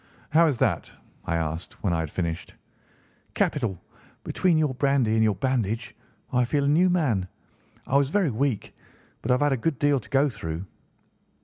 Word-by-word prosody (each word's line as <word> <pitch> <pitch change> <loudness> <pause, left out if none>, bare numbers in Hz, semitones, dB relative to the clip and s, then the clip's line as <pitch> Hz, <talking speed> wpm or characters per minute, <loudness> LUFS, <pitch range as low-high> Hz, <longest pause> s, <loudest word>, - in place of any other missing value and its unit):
"How 165 +2 +5
is 140 -5 0
that?" - - 0 0.3
I 85 - -1
asked 80 +1 -4
when 95 -4 +1
I 85 - +1
had 80 -2 -2
finished. 85 0 -4 0.8
"Capital! 115 - 0 0.4
Between 180 -4 +1
your 150 -4 +1
brandy 135 -4 +2
and 110 0 +3
your 105 -2 +2
bandage, 115 0 -1 0.4
I 125 0 +4
feel 140 +4 0
a - - +1
new 170 +6 +4
man. 130 - +1 0.6
I 135 - +2
was 140 -1 +2
very 180 -3 +2
weak, 125 -1 -2 0.5
but 115 - -5
I 125 - +5
have 125 - -2
had 145 -1 +3
a - - 0
good 145 +4 -1
deal 145 0 +2
to - - -15
go 140 +2 +3
through." 90 - -5
125 Hz, 185 wpm, -26 LUFS, 100-145 Hz, 0.8 s, How